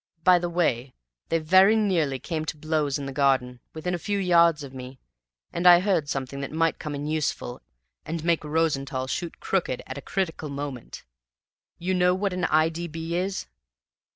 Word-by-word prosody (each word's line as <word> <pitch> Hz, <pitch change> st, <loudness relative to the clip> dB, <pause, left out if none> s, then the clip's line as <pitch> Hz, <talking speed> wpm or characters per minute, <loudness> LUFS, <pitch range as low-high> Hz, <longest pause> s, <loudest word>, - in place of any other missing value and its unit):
By 180 Hz, 0 st, +6 dB
the 175 Hz, 0 st, -2 dB
way, 135 Hz, -7 st, 0 dB, 0.3 s
they 165 Hz, -, +2 dB
very 185 Hz, +6 st, +5 dB
nearly 175 Hz, -11 st, +1 dB
came 155 Hz, +3 st, -4 dB
to 155 Hz, -, -4 dB
blows 155 Hz, -2 st, 0 dB
in 140 Hz, -, -5 dB
the 135 Hz, -, -5 dB
garden, 130 Hz, -3 st, +1 dB, 0.2 s
within 180 Hz, +3 st, -3 dB
a 175 Hz, -, -2 dB
few 205 Hz, +3 st, -2 dB
yards 170 Hz, -5 st, +4 dB
of 135 Hz, -1 st, -9 dB
me, 130 Hz, 0 st, -9 dB, 0.5 s
and 175 Hz, +1 st, +2 dB
I 175 Hz, -1 st, +9 dB
heard 180 Hz, -6 st, 0 dB
something 140 Hz, -1 st, -3 dB
that 140 Hz, -, -5 dB
might 165 Hz, +1 st, +1 dB
come 150 Hz, -2 st, -5 dB
in 145 Hz, +1 st, -4 dB
useful 150 Hz, -5 st, -2 dB, 0.4 s
and 160 Hz, 0 st, -4 dB
make 170 Hz, -2 st, +2 dB
Rosenthall 145 Hz, -4 st, -1 dB
shoot 170 Hz, +5 st, -4 dB
crooked 175 Hz, -10 st, -1 dB
at -, -, -6 dB
a -, -, -10 dB
critical 160 Hz, -4 st, -3 dB
moment. 140 Hz, -3 st, -6 dB, 0.7 s
You 185 Hz, +2 st, -1 dB
know 180 Hz, 0 st, +3 dB
what 195 Hz, 0 st, -1 dB
an 180 Hz, -1 st, -1 dB
I. 155 Hz, 0 st, +3 dB
D. 170 Hz, +1 st, -5 dB
B. 165 Hz, +1 st, -5 dB
is?" 190 Hz, +2 st, -2 dB
160 Hz, 185 wpm, -25 LUFS, 140-175 Hz, 0.7 s, I